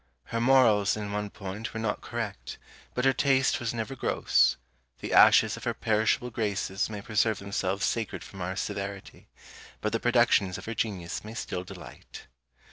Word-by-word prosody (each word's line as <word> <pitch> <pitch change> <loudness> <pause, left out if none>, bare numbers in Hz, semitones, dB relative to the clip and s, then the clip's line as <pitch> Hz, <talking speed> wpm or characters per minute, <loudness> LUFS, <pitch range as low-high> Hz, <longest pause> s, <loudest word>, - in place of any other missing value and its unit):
Her 115 - -1
Morals 115 -6 +4
in 105 -1 -4
one 105 0 -2
point 100 +3 -7
were - - -2
not 110 -2 -2
correct, 110 -4 -5 0.4
but 125 - 0
her 135 - +5
taste 135 -1 +2
was 120 -2 -2
never 120 +3 -4
gross: - - +2 0.4
the - - -4
ashes - - +6
of - - -10
her - - -1
perishable 110 +3 +1
graces 100 -3 -1
may 105 -2 -6
preserve 110 0 +1
themselves 100 -1 -2
sacred 115 -2 -2
from 95 - -10
our 90 +2 -3
severity; 100 0 -5 0.5
but 110 - -2
the 115 - 0
productions 120 -6 +3
of - - -9
her 115 - -4
genius 95 -7 -3
may 110 +2 -9
still 90 -5 -4
delight. - - -11
105 Hz, 170 wpm, -28 LUFS, 100-115 Hz, 0.5 s, ashes